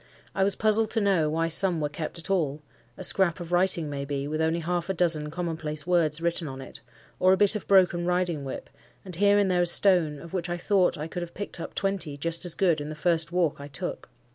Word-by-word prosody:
I 195 - +1
was 195 0 +2
puzzled 215 0 +1
to 225 - +2
know 190 -7 +2
why 165 +2 0
some 175 +1 +4
were 150 - 0
kept 155 +3 -6
at 170 +3 -4
all; 150 -5 -1 0.3
a - - -7
scrap 190 -2 +3
of 175 -1 -8
writing 175 -3 +2
maybe, 140 -1 -4
with 155 +1 -2
only 160 +1 0
half 175 +2 -2
a 190 - -1
dozen 160 -4 +1
common 165 0 -4
place 155 -1 -5
words 165 -4 +1
written 170 -1 -2
on 135 -1 -7
it, 135 - -10 0.4
or 185 +1 +5
a - - +2
bit 205 +1 +3
of 215 - -5
broken 180 -3 +3
riding 180 -4 0
whip, 135 - -7 0.3
and 180 -3 -8
here 205 +1 +4
and 200 -2 +2
there 180 -1 +2
a 175 - +2
stone, 175 -4 +3
of 170 +4 -12
which 175 -2 -2
I 175 - -2
thought 185 0 +1
I 150 +2 -5
could 175 +2 -6
have 170 0 -8
picked 200 -2 -6
up - - -7
twenty 195 -7 -2
just 170 +4 -2
as 170 -2 0
good 170 -6 +1
in 145 - -6
the 155 - -6
first 165 0 0
walk 170 -5 0
I 140 - -8
took. 140 -2 -5
170 Hz, 245 wpm, -26 LUFS, 155-185 Hz, 0.4 s, or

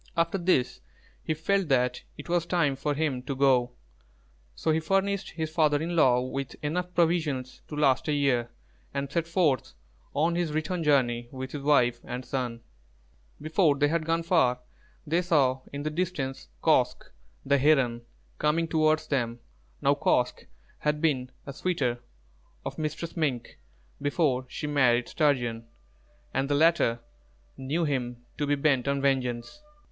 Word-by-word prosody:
After 170 +3 +1
this, 170 -8 +1 0.4
he 155 - -1
felt 195 +4 0
that 125 -2 +1 0.2
it 145 - -9
was 170 -1 0
time 155 -6 +1
for 145 +2 -2
him 145 -4 -1
to 135 +2 -4
go; 130 -2 +3 0.8
so 160 - 0
he 155 - +2
furnished 195 +4 0
his 160 -1 -4
father 155 -3 +3
in 170 +3 -3
law 125 -6 +4
with 130 0 -4
enough 180 +4 -2
provisions 155 -7 0
to 150 - -7
last 135 -2 +2
a - - +1
year, 130 -5 +1 0.5
and 140 0 -2
set 165 +1 -1
forth 160 - +1 0.4
on 160 +4 +2
his 170 -3 -1
return 165 +3 -1
journey 120 -5 +2
with 130 0 -6
his 145 - -5
wife 125 -5 +3
and 125 +1 -6
son. 125 -3 -3 0.8
Before 155 0 +2
they 145 +1 +3
had 165 0 0
gone 165 +1 0
far, 145 -8 +2 0.4
they 165 +3 +1
saw 140 -7 +2
in 140 0 -5
the 155 - -2
distance 150 - -3 0.2
Kosq', - - +2 0.3
the 140 0 +3
Heron, 130 -5 +3 0.4
coming 165 +2 +1
towards 155 -1 +2
them. 120 -4 -1 0.4
Now - - +5
Kosq' - - 0 0.3
had 150 0 0
been 135 -6 0 0.2
a 140 - -6
suitor 135 -7 -1 0.7
of - - -5
Mistress 155 +2 -4
Mink 140 -8 -2 0.4
before 140 -3 +1
she - - -5
married 125 -5 +3
Sturgeon, 120 -7 0 0.7
and 135 +1 0
the 145 - +2
latter 150 -7 +3 0.5
knew 150 +6 -1
him 125 -4 -3
to 145 - 0
be 145 - +3
bent 140 -3 +1
on 140 0 +1
vengeance. 130 - -1
145 Hz, 155 wpm, -27 LUFS, 130-160 Hz, 0.8 s, Now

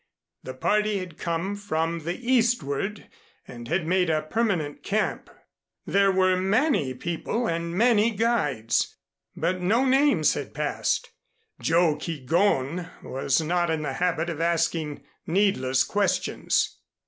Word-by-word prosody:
The 130 - -8
party 210 +9 +1
had 180 -4 -7
come 170 +4 -2
from 165 -5 -2
the 170 +1 -2
eastward, 225 - 0 0.4
and 120 -1 -9
had 170 +4 0
made 180 +1 +2
a 155 -1 +1
permanent 170 -5 -1
camp; 210 +1 -1 0.6
there 200 0 +3
were 185 0 +3
many 190 - +1
people 175 - -2
and 170 -2 -2
many 230 -1 +4
guides, 195 - 0 0.4
but 180 +3 -1
no 225 +9 +2
names 275 +3 +3
had - - -6
passed. - - -1 0.5
Joe 165 -2 +2
Keegón 165 +1 0
was 135 +3 0
not 175 +2 0
in 160 -1 -1
the 140 -3 -3
habit 170 0 0
of 160 -1 -5
asking 165 -3 0 0.2
needless 160 -9 +2
questions. 205 -1 0
175 Hz, 125 wpm, -25 LUFS, 155-205 Hz, 0.6 s, many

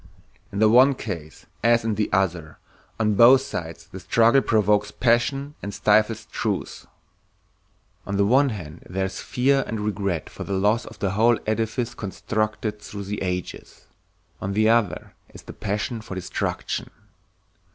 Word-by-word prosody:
In 100 - -6
the 110 +1 +5
one 130 +5 +6
case 85 -10 -7 0.2
as 115 -1 +3
in 110 - +1
the 105 0 -1
other, 90 -4 -1 0.4
on 105 -1 +2
both 120 +6 +7
sides 85 -8 -6
the 95 +1 -10
struggle 115 +7 +4
provokes 105 -3 +2
passion 130 +4 +1
and 100 - -5
stifles 110 +1 +2
truth. - - -3 1.2
On 100 0 -2
the 100 - +3
one 135 +6 +4
hand 85 -8 -7
there 95 +1 -1
is 95 - -5
fear 135 +2 +1
and 110 - -3
regret 100 -5 -2
for - - -8
the 100 - -4
loss 105 +5 +1
of - - -11
the 100 -3 -1
whole 115 +3 +3
edifice 115 +2 -1
constructed 110 +1 -3
through 100 -1 -7
the 100 +1 -5
ages, 90 -1 -5 0.6
on 95 +1 -3
the 110 +2 +3
other 110 -8 +1 0.2
is - - -11
the - - -10
passion 105 +3 -3
for 95 - -8
destruction. 95 - -3
105 Hz, 155 wpm, -24 LUFS, 95-115 Hz, 1.2 s, both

